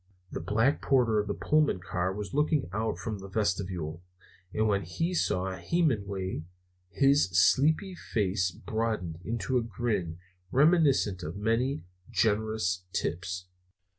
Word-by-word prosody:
The - - -4
black 115 +8 +1
porter 120 -5 +3
of 105 - -1
the 100 - -2
Pullman 150 -9 +2
car 90 +1 -2
was 100 +1 -6
looking 150 0 +2
out 110 +2 -1
from 110 -3 -4
the 95 - -8
vestibule, 90 -5 -2 0.5
and 110 +1 +1
when 100 -2 +2
he 165 - -2
saw 95 - 0
Hemenway 100 - -1 0.5
his 140 -1 +3
sleepy 155 - +4
face 95 - 0
broadened 105 -4 -3
into 115 +4 0
a - - -1
grin 105 -6 -2 0.3
reminiscent 140 - +3
of 85 +2 -5
many 115 +7 0 0.3
generous 110 -3 +1
tips. 90 +1 -2
105 Hz, 130 wpm, -29 LUFS, 95-130 Hz, 0.5 s, sleepy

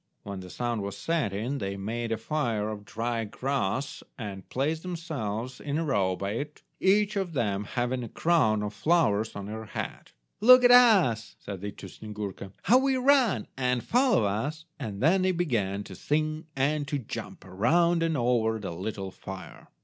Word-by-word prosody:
When 100 -1 -6
the 90 -1 -9
sun 120 +1 -2
was 100 0 -5
setting 135 -4 -1
they 100 -1 -3
made 115 +4 -3
a 115 - +1
fire 115 -4 -1
of 105 -1 -7
dry 115 +1 -2
grass 130 +2 -2 0.2
and 100 -5 -7
placed 155 +5 -1
themselves 135 - -4
in 145 0 -2
a 165 - 0
row 95 -9 +1
by 100 +2 -3
it, 145 +7 -5 0.2
each 205 +2 +3
of 190 -4 -2
them 105 -6 0
having 125 +2 -2
a 115 - -6
crown 110 -12 +2
of 105 0 -4
flowers 110 -7 +2
on 100 -1 -5
her 110 +2 -6
head. - - -6 0.3
"Look 255 +3 +8
at 245 - +7
us," 195 - +5
said 100 -3 -7
they 105 - -3
to - - -10
Snyegurka, 100 -2 -7
"how 250 +3 +6
we 270 0 +2
run, 255 - +3
and 125 -2 0
follow 250 - +3
us," 140 +11 -2
and 110 -5 -5
then 180 +5 +4
they 185 0 +3
began 110 - -1
to 95 - -10
sing 155 - -1
and 145 +2 0
to 145 - -1
jump, 130 - -7
around 165 - +2
and 165 -2 +1
over 120 -2 +2
the 100 -5 -5
little 95 +2 -5
fire. 95 0 -9
120 Hz, 180 wpm, -28 LUFS, 105-160 Hz, 0.3 s, Look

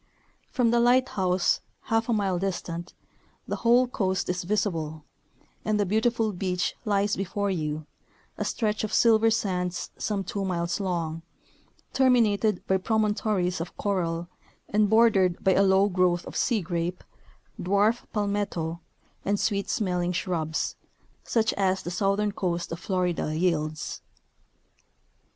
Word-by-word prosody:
From 240 -3 +2
the 235 - +3
light 250 +2 +4
house, 185 -2 +1 0.2
half 225 +1 0
a - - +3
mile 195 -4 0
distant, 175 -2 -4 0.5
the - - -2
whole 240 +2 +4
coast 190 -6 -1
is 180 0 -1
visible, 165 -6 -1 0.6
and 215 -1 0
the 205 - +2
beautiful 220 +2 +1
beach 180 -1 -1
lies 205 -1 +1
before 200 +1 -2
3^ou, 155 -4 -2 0.5
a - - -3
stretch 215 -2 -1
of 215 - -2
silver 225 -1 +5
sands 180 -5 -1
some 205 -2 -1
two 200 +1 -3
miles 170 -2 -1
long, 170 -4 -2 0.7
terminated 220 -6 +3
by 190 - +2
promontories 210 -3 0
of 170 - -7
coral, 175 -4 -1 0.4
and 210 0 +2
bordered 205 -5 +4
by 190 - +4
a 195 - +4
low 195 0 +4
growth 180 -2 +1
of - - -9
sea 235 -5 +1
grape, 175 +1 -3 0.6
dwarf 205 +5 +2
palmetto, 200 -6 -2 0.4
and 200 0 0
sweet 200 -2 0
smelling 180 -4 0
shrubs, 165 -3 -2 0.5
such 225 -2 +1
as 190 -1 0
the 175 - -4
southern 200 +3 +1
coast 175 -4 -2
of 165 - -4
Florida 180 -4 -1
yields. 155 -3 -1
195 Hz, 135 wpm, -26 LUFS, 175-210 Hz, 0.7 s, silver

